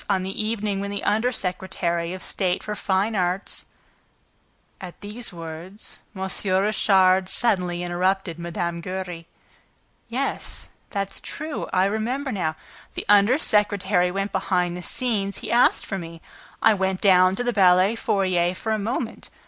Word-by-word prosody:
on 190 -2 +2
the 195 +3 -3
evening 215 -2 -1
when 200 0 -3
the 200 0 -4
under 220 +4 +2
secretary 180 -4 -2
of 185 0 -6
state 185 -2 -1
for 210 - -3
fine 200 +3 0
arts 180 0 -1 0.6
..." - - -31
At 180 -2 -9
these 210 +4 -6
words, 170 +4 -7 0.2
M. 190 0 -3 0.3
Richard 190 -2 +3
suddenly 180 -6 +1
interrupted 180 0 0
Mme. 170 0 -3
Giry: 180 -2 -5 0.8
"Yes, 260 +4 -3 0.2
that's 200 -2 -3
true, 310 0 -5
I 185 0 +3
remember 240 +7 -1
now! 165 -7 -1 0.4
The - - -4
under 205 +5 +6
secretary 205 - +2
went 195 +2 -2
behind 180 -2 0
the 180 - -6
scenes. 200 -2 -1
He - - -6
asked 240 +1 +4
for 195 - -3
me. 165 -1 -8 0.4
I 220 - +7
went 190 -2 0
down 185 -1 +5
to 245 - -1
the 245 0 0
ballet 185 0 +5
foyer 185 -5 +1
for 220 - -3
a 215 - +1
moment. 225 +2 -3
190 Hz, 150 wpm, -24 LUFS, 180-210 Hz, 0.8 s, I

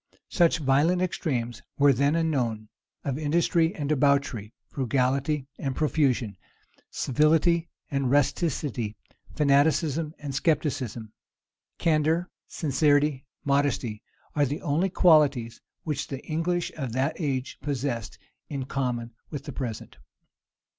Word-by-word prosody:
Such 170 -3 +3
violent 150 +5 +3
extremes 125 -10 -2 0.2
were 140 -1 +6
then 140 +5 +2
unknown, 125 -10 -1 0.3
of 140 0 -2
industry 165 +3 +2
and 145 -3 -3
debauchery, 140 -7 +1 0.2
frugality 135 +2 0
and 135 -2 -2
profusion, 135 -8 +1 0.5
civility 160 +4 +2 0.2
and 140 -2 0
rusticity, 140 - 0 0.4
fanaticism 150 +2 +2
and 145 -2 -6
scepticism. 135 -7 -1 0.6
Candor, 160 +2 +1 0.2
sincerity, 145 -2 +1 0.2
modesty, 140 -6 0 0.3
are 145 -2 +3
the 145 +4 -4
only 165 +7 +1
qualities 145 -10 +3 0.2
which 150 -3 -2
the 135 -1 -7
English 170 +2 -1
of 135 -7 -4
that 135 +5 0
age 135 -4 -2
possessed 130 -6 -3 0.3
in 140 -3 -3
common 125 -4 -2 0.2
with 145 - -6
the 145 - -6
present. 120 -5 -5
145 Hz, 110 wpm, -26 LUFS, 130-155 Hz, 0.6 s, were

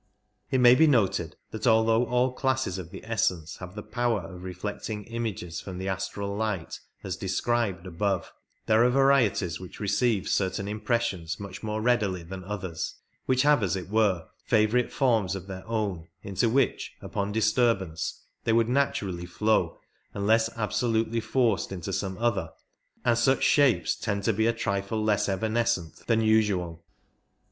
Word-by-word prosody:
It 135 - +1
may 125 -1 +8
be 160 +5 +5
noted 100 - +2 0.2
that 110 +2 -3
although 115 +1 +4
all 125 +2 +1
classes 130 -8 -1
of 85 -2 -7
the - - -10
essence 90 -7 -1
have 90 +1 -9
the 105 - -6
power 120 -4 0
of 90 +1 -10
reflecting 105 +3 -5
images 110 -8 -4
from 95 -2 -7
the 95 +1 -4
astral 100 +1 -3
light 105 -6 -3 0.2
as - - -3
described 100 -1 -1
above, 95 +1 -2 0.3
there 110 +1 +4
are 125 - +5
varieties 125 - +3
which 90 -1 -10
receive 105 0 +1
certain 100 +1 0
impressions 105 -6 -1
much 100 -2 -8
more 110 0 -3
readily 105 -7 +1
than 95 +2 -8
others 95 -4 -4 0.2
— - - -44
which 130 0 +3
have, 145 -4 +4
as 95 -2 0
it 95 -1 -5
were, 105 -6 +2 0.2
favourite 110 +3 +2
forms 110 -8 +2
of 95 -1 -6
their 95 -1 -7
own 100 -8 -2 0.2
into 100 +3 0
which 135 +3 +1
upon 100 0 -3
disturbance 110 -6 0 0.2
they 115 - +2
would 115 0 +3
naturally 100 -10 0
flow 110 +5 +1 0.4
unless 110 +3 +3
absolutely 115 +1 0
forced 115 -6 +1
into 90 -4 -5
56 - - +1
some 95 -2 -4
other, 110 -8 0 0.6
and 120 -1 +3
such 130 +3 +3
shapes 140 -5 +4
tend 100 -2 -2
to 115 - +2
be 110 +3 +2
a - - +4
trifle 100 0 -2
less 105 -1 +2
evanescent 110 -3 -1
than 115 -1 +3
usual. 100 -7 +1
105 Hz, 160 wpm, -27 LUFS, 95-115 Hz, 0.6 s, may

